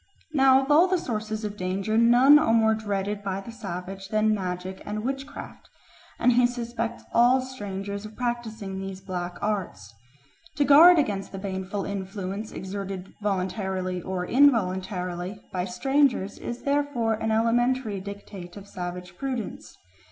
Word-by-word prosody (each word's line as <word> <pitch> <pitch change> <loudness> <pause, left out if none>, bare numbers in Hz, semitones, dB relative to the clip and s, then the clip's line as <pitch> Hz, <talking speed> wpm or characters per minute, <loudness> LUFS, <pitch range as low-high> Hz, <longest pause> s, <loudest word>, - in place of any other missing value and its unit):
Now 270 -2 +5
of 275 - -2
all 360 +5 +5
sources 220 -7 -3
of 210 -1 -4
danger 195 +3 -2
none 245 +6 +7
are 300 -7 +2
more 220 -1 +4
dreaded 205 -1 -2
by 195 -1 -3
the 215 +4 -9
savage 195 -3 -6
than 215 +1 +2
magic 185 -1 -4
and 210 +1 -4
witchcraft, 270 +3 -6 0.5
and 250 - +4
he 245 0 +5
suspects 235 -1 -4
all 245 +3 +5
strangers 200 -6 -5
of 215 0 -10
practising 225 -5 -3
these 195 -1 -6
black 180 -2 -5
arts. 185 - -3 0.6
To 290 - +2
guard 330 +6 +9
against 205 -10 0
the 195 - -6
baneful 190 0 -4
influence 195 +1 -5
exerted 195 -1 -6
voluntarily 190 -2 -2
or 180 0 -3
involuntarily 190 -7 +1
by 180 -1 -1
strangers 245 +2 +1
is 240 0 -6
therefore 280 -5 +1
an 220 +1 -2
elementary 230 0 +1
dictate 200 -2 -9
of 200 0 -10
savage 180 -1 -6
prudence. 245 - -5
205 Hz, 140 wpm, -26 LUFS, 190-240 Hz, 0.6 s, guard